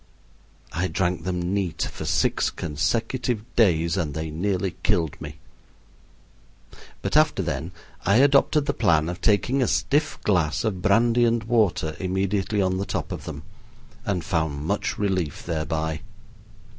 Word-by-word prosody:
I 90 +3 0
drank 90 0 -1
them 90 0 -1
neat 95 -5 -1
for - - -7
six - - +1
consecutive 115 - -1
days, 85 -6 +3
and 75 -6 -2
they 80 0 -3
nearly 95 +2 -1
killed 80 -3 +1
me; 75 0 -7 1.7
but - - -2
after - - +4
then 75 +6 -3 0.3
I 100 - +3
adopted 140 +3 +4
the - - 0
plan 80 -1 +2
of 90 - -6
taking 120 +6 +2
a 125 - +2
stiff 150 +2 +1
glass 80 -6 +1
of 100 -5 -2
brandy 115 +4 +3
and 115 -1 +2
water 105 -9 +1
immediately 95 +2 0
on 95 0 0
the 100 - -2
top - - -3
of - - -6
them, 70 +1 -7 0.6
and 95 -7 -2
found 80 -5 -1
much - - -1
relief 95 -7 -1
thereby. 80 -1 -2
95 Hz, 145 wpm, -24 LUFS, 80-105 Hz, 1.7 s, after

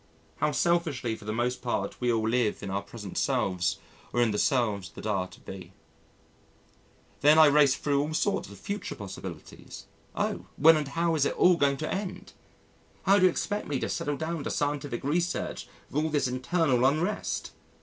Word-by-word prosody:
How 150 - +1
selfishly 150 -6 0
for 110 - -13
the 105 - -2
most 125 +3 -1
part 120 +1 -3
we 125 -1 +2
all 110 -1 +1
live 115 -3 0
in 100 - -4
our 100 +1 -1
present 105 -2 -6
selves 90 -3 0 0.3
or 120 - -1
in 120 -2 +3
the 105 - -1
selves 105 - +1
that - - -9
are 95 -4 0
to - - -16
be. 95 -1 -10 1.5
Then 150 +3 +6
I 160 - +9
raced 145 -2 +5
thro' 140 -1 +2
all 150 +2 -3
sorts 200 - 0
of - - -11
future 200 -1 -5
possibilities 100 -2 -9 0.3
oh! - - -2
when 160 +2 +7
and 150 -2 -1
how 165 +3 0
is 150 -3 +2
it - - -1
all 180 0 +6
going 140 -4 +2
to 155 - -3
end? 190 -1 -5 0.7
How 200 +1 +5
do 185 - +5
you - - +7
expect 205 +4 -3
me 140 -3 -1
to - - -2
settle 145 0 -2
down 160 -1 -3
to - - -2
scientific 145 -4 -2
research 170 +5 -1 0.2
with 150 +2 0
all 160 - 0
this 145 -3 +1
internal 130 0 +1
unrest! 155 +10 0
140 Hz, 190 wpm, -28 LUFS, 115-160 Hz, 1.5 s, I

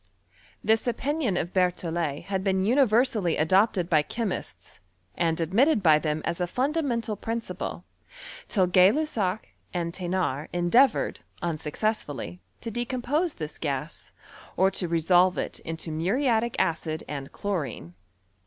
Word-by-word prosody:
This 220 +2 +2
opinion 250 - 0
of 175 +1 -2
Berthollet 170 -5 0
had 190 -1 -2
been 190 -1 +1
universally 230 - +3
adopted 185 +2 +3
by 155 -4 +4
che 230 +9 -3
mists, 190 - -6 0.3
and 165 -1 0
admitted 210 - +3
by 155 -3 +6
them 155 0 -2
as 170 - -2
a 175 - +1
fundamental 250 - -1
prin 225 +3 -3
ciple, 230 - -6 0.6
till 190 -4 +2
Gay 180 +2 +6
Lussac 220 -9 -1 0.3
and 170 -1 -2
Thenard 175 -6 -2
endeavoured, 215 +9 +3 0.2
un 165 -3 -1
successfully, 150 - -3 0.2
to 230 - -5
decompose 255 - -1
this 155 -2 -7
gas, 150 +1 -4 0.5
or 190 +1 +4
to 185 -2 0
resolve 175 +2 +3
it - - -3
into 165 0 -5
muriatic 225 - +1
acid 160 -2 -1
and 140 -2 -6
chlorine. 145 - -4
185 Hz, 135 wpm, -26 LUFS, 165-230 Hz, 0.6 s, by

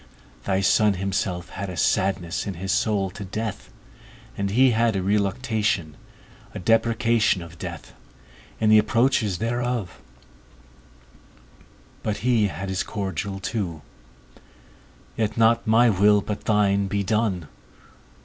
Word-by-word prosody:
Thy 95 -1 +1
Son 105 +1 +3
himself 90 -2 -2
had 100 0 -6
a 90 - -7
sadness 95 0 0
in 100 - -4
his 95 +3 -3
soul 100 -3 0
to 100 - -8
death, 105 +2 -5 0.6
and 100 0 -2
he 125 +5 +4
had 115 -1 +2
a 95 - -1
reluctation, 105 - 0 0.6
a - - -3
deprecation 115 -1 +2
of 85 0 -13
death, - - -8 0.7
in 110 -1 +3
the 110 - +8
approaches 110 -2 +1
thereof; 120 -4 -3 2.0
but 105 -1 -2
he 115 -4 +3
had 95 +2 -6
his 95 -1 -1
cordial 95 -1 -4
too, 90 -6 -4 1.3
Yet 110 0 -2
not 115 +1 +3
my 115 +2 +5
will, 105 +1 +4
but 105 +1 -5
thine 100 -2 +2
be 100 +1 -1
done. 100 -5 -1
100 Hz, 125 wpm, -24 LUFS, 95-110 Hz, 2.0 s, the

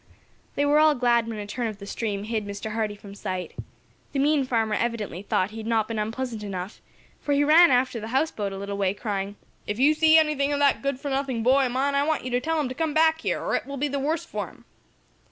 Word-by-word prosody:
They 285 - +1
were 295 +1 +4
all 310 -1 +5
glad 240 -2 +2
when 225 -1 -5
a 205 - -5
turn 235 +3 -3
of 215 -2 -6
the 200 - -10
stream 200 -1 -3
hid 220 0 -2
Mr. 200 +2 -5
Hardee 215 -1 -2
from 200 -1 -12
sight. 185 -2 -5 0.6
The - - -2
mean 285 0 +2
farmer 225 -4 0
evidently 215 -6 -2
thought 200 -1 0
he 220 - -9
had 220 0 -6
not 225 -2 +1
been 225 -2 -3
unpleasant 225 +1 -3
enough, 195 -1 -6 0.4
for 290 - -1
he 285 +1 +3
ran 325 +4 +7
after 250 -2 +2
the 220 - -6
houseboat 230 -5 -1
a 195 - -6
little 200 +1 -5
way, 195 0 +1
crying: 200 -2 -3 0.3
"If 205 - -2
you 280 +5 +5
see 315 +1 +5
anything 300 -3 +2
of 290 - 0
that 285 -1 +3
good 275 -2 -2
for 285 0 -4
nothing 265 -4 -1
boy 265 +2 +4
of - - -5
mine, 275 +2 +1
I 280 - +2
want 310 -2 0
you 255 - -4
to 245 +1 +1
tell 320 +3 0
him 295 - 0
to - - -4
come 315 +2 -2
back 320 0 +4
here, - - -1
or - - -3
it - - -1
will 280 0 -6
be 290 +3 0
the 280 0 -2
worse 310 +4 -1
for - - -4
him." - - -18
245 Hz, 260 wpm, -25 LUFS, 210-285 Hz, 0.6 s, ran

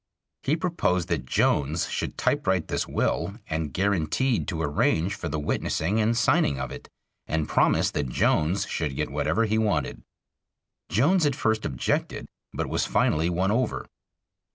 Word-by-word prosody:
He 145 - +1
proposed 95 - 0
that 75 -7 -2
Jones 75 +5 +1
should - - -4
typewrite 95 -3 0
this - - -1
will, 100 - -1
and 80 -2 -2
guaranteed 100 - 0
to 85 -5 -3
arrange 80 +4 +1
for 85 - -5
the 80 - -2
witnessing 80 +6 -1
and 115 +2 +2
signing 70 - +2
of 65 -1 -4
it, - - -9 0.4
and 80 -1 -1
promised - - +2
that 70 -3 -1
Jones 80 +8 +1
should 75 -4 -2
get - - -2
whatever 115 - +1
he 110 0 +1
wanted. 95 -11 0 0.9
Jones 160 - +3
at 140 - 0
first 110 -6 0
objected, 65 -3 -1 0.3
but - - -2
was - - -1
finally 80 +2 +2
won 90 +3 +1
over. 120 +1 0
90 Hz, 155 wpm, -26 LUFS, 80-110 Hz, 0.9 s, Jones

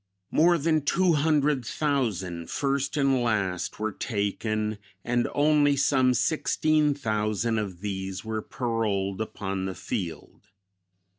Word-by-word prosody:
"More 170 +2 +4
than 155 0 +1
two 175 +5 +2
hundred 150 -3 +2
thousand, 105 - -2
first 140 0 -1
and 135 -3 +3
last, 100 -6 -1
were 110 0 -1
taken, 105 0 -2 0.3
and 120 0 +1
only 145 -1 +4
some 130 -2 +3
sixteen 155 -1 +2
thousand 110 -2 0
of 95 -4 -5
these 95 -1 -4
were 110 -1 -2
paroled 105 -5 -2
upon 95 -3 -3
the 95 -1 -4
field.... 90 0 -6
115 Hz, 120 wpm, -27 LUFS, 100-145 Hz, 0.3 s, More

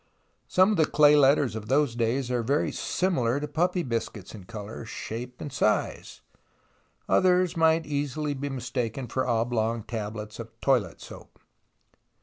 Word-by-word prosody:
Some 185 +3 +4
of 210 - 0
the 160 - +4
clay 150 -1 +6
letters 140 -3 +4
of 110 -1 -6
those 140 0 +2
days 120 +2 0
are 125 -1 +1
very 140 +6 0
similar 140 -9 0
to 150 - -4
puppy 175 +4 0
biscuits 115 - -4
in 100 -4 -10
colour, 110 +1 -8
shape 120 +2 -7
and 145 - -7
size; 105 - -1 0.9
others 180 -1 +3
might 160 0 +3
easily 145 0 -2
be 140 +1 -4
mistaken 125 -1 -3
for 130 +2 -2
oblong 115 -1 0
tablets 105 -1 -6
of 115 0 -10
toilet 120 - +1
soap. - - -12
125 Hz, 145 wpm, -27 LUFS, 115-150 Hz, 0.9 s, clay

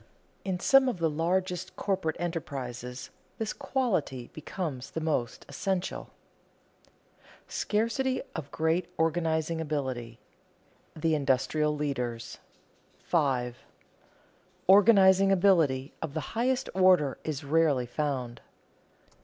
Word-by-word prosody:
In 190 -2 -2
some 270 +5 +5
of 240 - -3
the 165 -2 +1
largest 180 +3 -1
corporate 190 -6 -1
enterprises 130 -7 -5 0.3
this 220 -1 -2
quality 175 - -2
becomes 155 -4 -5
the - - -4
most 155 -7 -2
essential. 180 +6 -3
[Sidenote: - - -33 0.2
Scarcity 230 +5 0
of 150 -4 -5
great 160 +3 0
organizing 160 0 0
ability] 130 -7 -3 0.8
[Sidenote: 155 - -10
The 165 -1 +3
industrial 150 +2 +1
leaders] 125 -6 -3 0.6
5. 130 -7 0 1.1
_Organizing 195 -1 +6
ability 165 -8 +3
of 160 -2 -5
the 155 - -4
highest 255 +3 +1
order 185 -7 +4
is 155 -2 -4
rarely 145 -3 +2
found. 125 -3 -3
160 Hz, 105 wpm, -29 LUFS, 135-190 Hz, 1.1 s, Organizing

